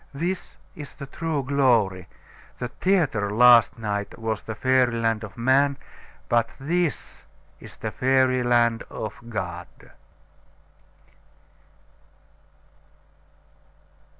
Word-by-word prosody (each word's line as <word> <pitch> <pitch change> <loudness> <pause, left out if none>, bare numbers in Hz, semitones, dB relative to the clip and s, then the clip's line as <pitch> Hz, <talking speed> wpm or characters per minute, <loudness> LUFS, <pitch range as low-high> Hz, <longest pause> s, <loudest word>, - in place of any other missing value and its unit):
This 175 +5 -4 0.2
is 145 -2 -9
the 140 - -9
true 155 0 -3
glory. 115 -10 +1 0.5
The 125 - -4
theatre 145 - 0
last 120 +1 +6
night 105 -2 -4
was 110 -2 -3
the 110 - -7
fairy 130 0 +2
land 115 -1 0
of 105 - -10
man; 135 +3 +2 0.5
but 115 -1 +2
this 165 +2 -2 0.4
is - - -13
the - - -5
fairy 130 -1 +2
land 120 -2 +2
of 110 -1 -5 0.2
God." 90 -5 -5
120 Hz, 95 wpm, -24 LUFS, 110-140 Hz, 0.5 s, last